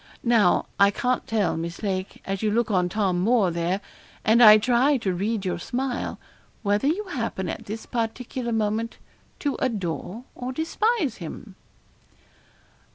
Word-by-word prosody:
Now, 230 -6 +4
I 200 0 +7
can't 250 +5 -1
tell, 215 -4 +1
Miss 170 +5 -5
Lake, 190 -2 -3
as 195 -1 -3
you 215 - +1
look 230 +1 +1
on 180 -2 +2
Tom 190 -2 0
Moore 205 -1 +3
there, 170 +3 -1 0.4
and 225 +3 +5
I 215 -2 +10
try 250 +6 +3
to 195 -6 -1
read 205 +3 -2
your 180 - -1
smile, 250 +6 -3 0.5
whether 205 +5 +1
you 355 +8 +1
happen 230 - -3
at - - -6
this 220 +2 -6
particular 235 +1 -3
moment 225 +1 -1 0.4
to 285 -2 -1
adore 200 - -3
or 250 +1 -5
despise 330 - 0
him.' 185 +4 -8
220 Hz, 150 wpm, -25 LUFS, 190-245 Hz, 0.5 s, I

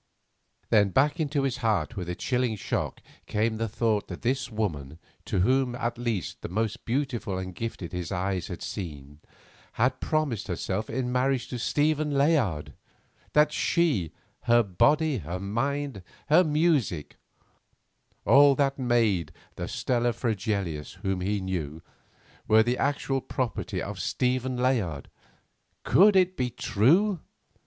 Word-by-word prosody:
Then 105 -2 +5
back 145 - +2
into 145 -2 0
his 135 -2 -1
heart 110 -5 0
with 90 -3 -5
a 90 - -2
chilling 125 0 0
shock 100 - -3 0.3
came 110 +1 0
the 115 +1 -1
thought 110 -1 0
that 90 - -8
this 130 +2 0
woman, 80 - -3 0.3
to 95 - 0
him 130 -1 +2
at 120 -1 -2
least 115 -6 -3
the - - -5
most 110 +3 -2
beautiful 120 -6 -2
and 95 0 -5
gifted 100 -4 -5
his 90 -3 -4
eyes 95 0 -2
had - - -7
seen, 75 -6 -7 0.5
had - - +1
promised 145 -9 -1
herself 95 +3 -3
in 125 +1 -2
marriage 130 0 0
to 125 - -4
Stephen 150 +4 +1
Layard; 140 - +1 0.6
that 150 0 +4
she, 145 - +1 0.3
her 120 0 +5
body, 145 - +2
her 85 +2 -5
mind, 135 +4 -2 0.3
her 160 +5 +6
music—all 145 - 0
that 140 -1 0
made 115 - +2
her 80 - -22 0.2
the - - -4
Stella 120 -1 0
Fregelius 100 - -2
whom 95 -1 -1
he 100 +2 0
knew—were 95 +5 -2
the 120 +2 -1
actual 140 -1 0
property 125 -3 -3
of - - -6
Stephen 130 0 -1
Layard. 110 - -1 0.7
Could 205 +2 +5
it 185 -1 +4
be 125 -1 -1
true? 160 - +2
115 Hz, 135 wpm, -27 LUFS, 95-135 Hz, 0.7 s, her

